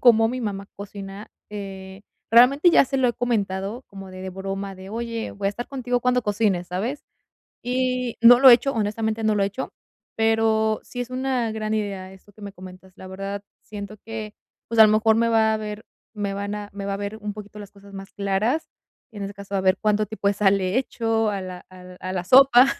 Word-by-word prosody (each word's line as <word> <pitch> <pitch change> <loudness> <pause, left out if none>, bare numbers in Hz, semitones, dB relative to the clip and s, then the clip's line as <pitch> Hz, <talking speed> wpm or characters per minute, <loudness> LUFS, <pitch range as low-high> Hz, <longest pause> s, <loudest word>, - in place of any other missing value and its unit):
cómo 225 -2 +6
mi 250 +1 -4
mamá 200 -2 -4
cocina, 200 0 -9 0.2
eh, 195 -1 -8 0.3
realmente 265 +8 +6
ya 340 - +6
se 270 0 -2
lo 255 - +3
he 240 - -1
comentado 210 -1 -2
como 195 -1 -10
de 185 - -9
de 190 - -5
broma 195 +1 -5
de: 190 +1 -11
"Oye, 230 0 -4
voy 200 -1 -4
a - - +4
estar 240 +4 -5
contigo 245 -2 -2
cuando 250 0 +2
cocines, 205 -5 0
¿sabes?", 220 +11 -3 0.6
y 250 -1 -1
no 240 +1 +9
lo 265 0 +9
he 240 - +11
hecho, 275 +3 0
honestamente, 220 0 -1
no 215 - +3
lo 205 - +1
he - - +3
hecho, 205 +7 -5 0.4
pero 220 -1 +2
sí 245 - -7
es 245 0 -4
una 255 -2 -1
gran 215 0 -2
idea 195 -3 -3
esto 190 +2 -18
que 210 - -19
me 200 - -7
comentas, 185 0 -13
la 190 - -11
verdad, 195 +1 -5 0.2
siento 205 0 -8
que, 220 -1 -6 0.4
pues, 230 - -3
a 220 - +11
lo - - +3
mejor 220 +1 +4
me 230 +1 +2
va 220 -1 +3
a - - +1
ver 210 0 -6 0.3
me 200 -2 -3
van 200 +1 -3
a 205 -1 -7
me 200 0 -6
va 200 0 -2
a - - -2
ver 205 +1 -5
un 210 0 -4
poquito 210 0 -10
las 200 - -10
cosas 200 0 -17
más 195 0 -9
claras 210 +10 -1 0.4
y 220 - -15
en - - -5
ese 200 - -6
caso, 200 0 -9
a 195 - +2
ver 185 0 +3
cuánto 215 0 +1
tipo 220 -1 -5
de 200 - +1
sal 200 -1 +3
le 185 +2 -1
hecho 225 -4 0
a 200 - -3
la 185 -1 -8
al 180 0 -13
a 185 0 -4
la 180 -2 -3
sopa 260 +2 +7
210 Hz, 230 wpm, -23 LUFS, 195-230 Hz, 0.6 s, he